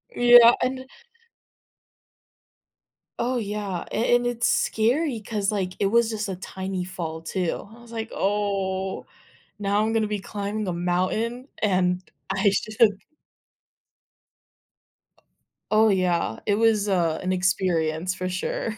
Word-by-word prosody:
Yeah, 240 -1 +8
and 260 +1 -2 2.3
Oh, 250 +1 0
yeah, 205 -4 -3
a 235 +2 +2
and 245 0 +1
it's 240 -1 0
scary 245 +4 +1
'cause, 205 -1 -2
like, 190 -3 -2
it 200 - +2
was 235 +2 +3
just 215 -1 -3
a 190 - -3
tiny 190 0 -5
fall 165 -3 -6
too. 180 +2 -3
I - - -16
was 235 -1 -15
like, 225 0 -5
"Oh, 195 -2 -1 0.5
now 205 0 +1
I'm 220 +1 0
gonna 225 -1 +1
be 210 0 -2
climbing 205 +1 -4
a 180 - -1
mountain 185 +8 -1
and 185 -3 +1 0.3
I 195 +1 +2
should" 215 +2 -1 3.0
Oh, 215 +1 +5
yeah, 180 - 0
it 205 - +2
was, 215 -1 +2
uh, 170 -5 +1
an 185 0 -1
experience 180 -2 0
for 185 0 -3
sure. 200 +4 -3
200 Hz, 130 wpm, -24 LUFS, 185-225 Hz, 3.0 s, Yeah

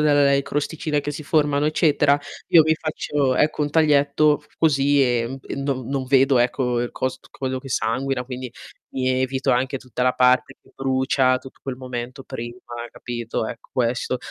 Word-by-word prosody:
delle 145 -2 +4
crosticine 150 +1 -2
che 145 - -3
si 150 +1 -6
formano, 150 -1 +2
eccetera, 150 -2 +3 0.3
io 165 - +7
mi 160 +1 +2
faccio, 145 -4 -1
ecco, 155 0 +1
un 145 - 0
taglietto 150 -1 +3
così 145 -2 +3
emb 125 +1 -1
e - - -5
non 135 -3 -2
non 135 -1 -2
vedo, 135 0 +4
ecco, 125 0 +1
il 120 - -2
cos 130 - -3
quello 130 -1 -3
che 135 - -10
sanguina, 125 +2 -1
quindi 125 0 -6 0.4
mi 130 -1 0
evito 130 +1 0
anche 130 +2 +1
tutta 125 -1 -5
la 125 0 +3
parte 125 0 +3
che - - -23
brucia, 130 -1 +2
tutt 130 - -14
quel 130 -2 -5
momento 125 +1 -6
prima, 120 0 -7 0.3
capito, 120 -2 -4
ecco, 115 0 -9
questo. 125 +1 0
135 Hz, 170 wpm, -22 LUFS, 125-145 Hz, 0.4 s, io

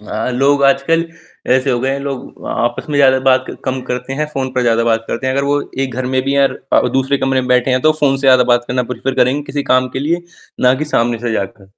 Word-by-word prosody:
हाँ, 110 +3 -4
लोग 140 +2 +2
आजकल 140 +5 +2 0.5
ऐसे 130 +1 +2
हो 120 - +1
गए 130 - 0
हैं, 140 - -2
लोग 140 -2 -7
आपस 120 +1 -2
में 145 - -1
ज़्यादा 130 -1 +5
बात 130 0 +3 0.2
कम 130 -1 -2
करते 125 +2 -4
हैं, 150 +3 -2
फ़ोन 130 -1 -2
पे 125 - +1
ज़्यादा 115 -1 +2
बात 115 -1 +1
करते 125 - -3
हैं। 130 - +1
अगर 140 +1 0
वो 145 +1 +1 0.2
एक 130 -3 -4
घर 130 0 -3
में 130 0 0
भी 135 +1 -1
हैं 140 -1 +4
र - - -9
अ, - - +4
दूसरे 135 +1 +1
कमरे 135 0 +1
में 125 - -5
भी 125 - +4
बैठे 125 +1 +1
हैं 130 0 +2
तो 155 - +4
फ़ोन 135 -2 +3
से - - -8
ज़्यादा 130 -2 +5
बात 120 0 +2
करना 125 0 0
प्रेफर 130 +2 -3
करेंगे 130 +3 +1
किसी 145 0 -4
काम 130 -1 +2
के 130 - -5
लिए, 170 +5 -1 0.4
ना 125 0 +4
कि 145 +4 -3
सामने 115 0 +1
से 120 0 -3
जाकर। 100 -1 -5
130 Hz, 270 wpm, -16 LUFS, 125-140 Hz, 0.5 s, ज़्यादा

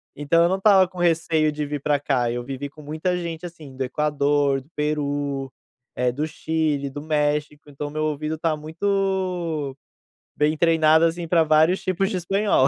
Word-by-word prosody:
então 155 +4 +3
eu 170 - +3
não 190 - +1
estava 195 -2 +5
com 185 0 -16
receio 165 -2 +2
de 150 0 -3
vir 145 -1 -4
pra 145 0 +1
cá, 130 -4 0
eu 120 0 -3
vivi 135 +2 -5
com 150 +2 -14
muita 155 +5 -2
gente, 170 -1 -5
assim, 155 -6 -10
do 135 - -1
Equador, 145 0 +1
do 135 - -23
Peru, 145 -2 -2 0.4
eh, 125 0 +1
do 145 +5 -2
Chile, 155 -3 -1
do 145 +2 -7
México, 150 0 -1
então 145 +1 -5
meu 155 +1 -3
ouvido 155 +1 -2
está 160 0 -1
muito 175 -3 -1 0.6
bem 150 +1 +1
treinado, 160 -1 +4
assim, 165 +1 -1
pra 165 0 +4
vários 155 +4 +3
tipos 185 +1 0
de 190 - -2
espanhol. 195 -5 +2
155 Hz, 180 wpm, -23 LUFS, 145-170 Hz, 0.6 s, estava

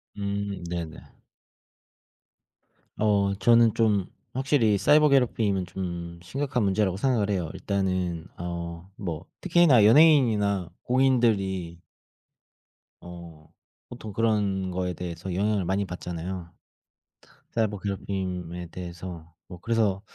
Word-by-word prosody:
음. 100 -2 -3
네네. 85 -2 -4 2.0
어. 100 -2 +2
저는 115 +1 +5
좀 105 -5 +2 0.3
확실히 130 -6 +2
사이버 150 +6 +5
괴롭힘은 110 -8 +2
좀 85 -2 -6
심각한 130 +5 -2
문제라고 95 -1 +1
생각을 110 -4 +1
해요. 90 -5 -1
일단은 95 -3 -2
어 85 0 -4 0.4
뭐 85 -3 -5 0.2
특히나 165 - +5
연예인이나 110 - +4
공인들이 110 -9 +1 1.2
어 85 -3 -11 0.4
보통 110 - -8
그런 100 -4 0
거에 90 0 -2
대해서 90 +1 -6
영향을 100 +1 +1
많이 95 +2 0
받잖아요, 90 0 -6 1.0
사이버 105 -3 -1
괴롭힘에 90 -3 -4
대해서. 85 -1 -8 0.2
뭐 90 -2 -10
그래서 110 -4 +1
100 Hz, 240 characters per minute, -26 LUFS, 90-110 Hz, 2.0 s, 저는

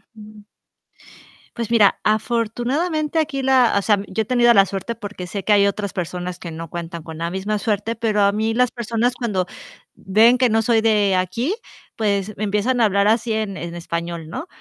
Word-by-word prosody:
Ujú. 215 -1 -13 1.1
Pues 235 -1 -4
mira, 215 -4 +4
afortunadamente 245 - 0
aquí 300 -3 -1
la 260 -2 +3
o - - +2
sea, 210 +1 +3
yo 190 +4 -2
he - - -2
tenido 240 0 +4
la 195 -3 +6
suerte 195 +4 -5
porque 205 -5 -7
sé 195 +1 -5
que 210 - +3
hay 200 -1 +5
otras 200 0 -3
personas 180 0 -4
que 170 - -7
no 165 0 -7
cuentan 170 0 -6
con 160 -1 -9
la 170 0 -2
misma 195 +3 -2
suerte, 215 +2 -1
pero 220 -2 0
a 200 0 +4
mí 220 +2 -1
las 250 +1 +2
personas 235 0 -1
cuando 210 -8 -1 0.5
ven 220 +6 +4
que 250 -1 +3
no 225 0 +2
soy 225 0 +2
de 210 -3 +3
aquí, 210 - -1 0.4
pues 205 -1 -1
me 210 - -3
empiezan 210 +5 0
a - - +6
hablar 200 -1 +2
así 225 +1 +1
en 215 -3 -2
en 170 0 -6
español, 170 -1 -5
¿no?, 315 - -6
215 Hz, 195 wpm, -21 LUFS, 190-235 Hz, 1.1 s, la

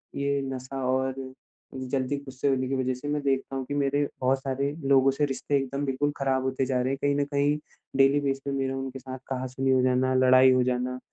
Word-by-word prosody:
ये 140 0 0
नशा 130 +1 -5
और 130 0 0 0.6
जल्दी 130 +1 -2
गुस्से 135 0 -3
होने 130 -1 +1
की 135 - -1
वजह 130 -1 0
से 125 +3 -7
मैं 145 0 -1
देखता 135 -1 -1
हूँ 135 -1 -3
कि, 145 - -5
मेरे 145 0 +1
बहुत 130 +1 +2
सारे 135 +1 -2 0.2
लोगों 135 0 +5
से 145 +2 0
रिश्ते 140 +1 -2
एकदम 140 +1 -2
बिल्कुल 140 +2 0
ख़राब 135 -1 +1
होते 130 0 0
जा 130 -1 0
रहे 125 - 0
हैं। - - -2
कहीं 145 0 +2
न 145 0 +1
कहीं 145 +1 +1 0.4
डेली 135 +1 +5
बेस 135 -1 -1
पे 140 - -2
मेरा 135 -1 -1
उनके 135 0 -5
साथ 130 0 -7
कहा-सुनी 130 0 -1
हो 130 -1 +4
जाना, 130 +1 +2
लड़ाई 130 0 +6
हो 130 0 +4
जाना 125 0 -1
135 Hz, 220 wpm, -27 LUFS, 130-140 Hz, 0.6 s, लड़ाई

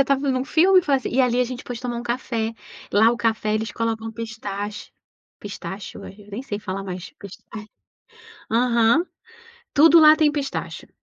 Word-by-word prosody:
está 275 0 +3
vendo 265 -2 -1
um - - -3
filme 365 +6 +5
e - - -14
fala 285 -4 +2
assim, 260 - -4
e 260 - +2
ali 250 -1 +2
a - - +3
gente 250 0 -7
pôde 245 -2 -7
tomar 245 -1 -4
um - - -5
café. 235 -2 -2 0.4
Lá 220 +3 +5
o - - -3
café 220 -2 0
eles 220 +1 -2
colocam 225 -1 -3
pistache 210 -2 -6 0.5
pistache 200 -1 -8
ué. - - -9
Eu 205 0 -16
nem 225 +6 -5
sei 250 -7 -5
falar 195 -1 -5
mais, 185 -1 -7
pis 200 -1 -11 0.2
ai. 215 -1 -6 0.9
Aham, 235 +5 +3 0.7
tudo 325 +3 +7
lá 310 -1 +8
tem 310 -1 +4
pistache, 290 -2 -5
235 Hz, 190 wpm, -22 LUFS, 210-265 Hz, 0.9 s, lá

